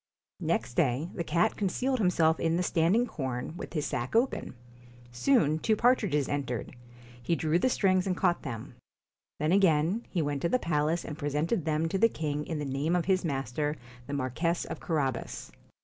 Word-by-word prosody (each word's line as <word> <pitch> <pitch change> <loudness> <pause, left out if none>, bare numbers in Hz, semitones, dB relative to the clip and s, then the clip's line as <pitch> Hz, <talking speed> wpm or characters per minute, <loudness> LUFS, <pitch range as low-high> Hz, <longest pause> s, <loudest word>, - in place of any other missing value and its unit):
Next - - -1
day 140 +3 +1
the 170 - -3
cat 175 +5 +1
concealed 250 +7 0
himself 165 -5 +3
in 165 0 +1
the 180 - +1
stand 170 +2 +2
ing 240 +2 +3
corn, 130 - -4
with - - -7
his 150 -4 -1
sack 120 - -3
open. 240 - +1 0.6
Soon 155 - +2
two 220 +6 +2
partridges 210 - +2
entered; 135 -5 -3 0.5
he 165 +8 0
drew 160 +1 +1
the 255 - +2
strings 185 -5 +2
and 185 -1 0
caught 175 - +2
them. 115 -5 -6 0.6
Then 155 +2 0
again, 185 +2 +3
he 170 -4 0
went 145 -1 -2
to 170 - +1
the 255 - +3
palace, 160 -3 0
and 150 -1 -7
presented 150 +6 -1
them 160 0 +1
to 190 +4 -1
the 230 +2 +5
king 150 -5 -3
in 160 - -3
the 150 - -3
name 140 +5 0
of 175 - 0
his 185 -1 +2
master, 145 0 -2 0.3
the 145 - -5
Marquess 145 +6 -1
of 165 - -6
Carabas. 135 -7 -2
160 Hz, 185 wpm, -29 LUFS, 145-185 Hz, 0.6 s, the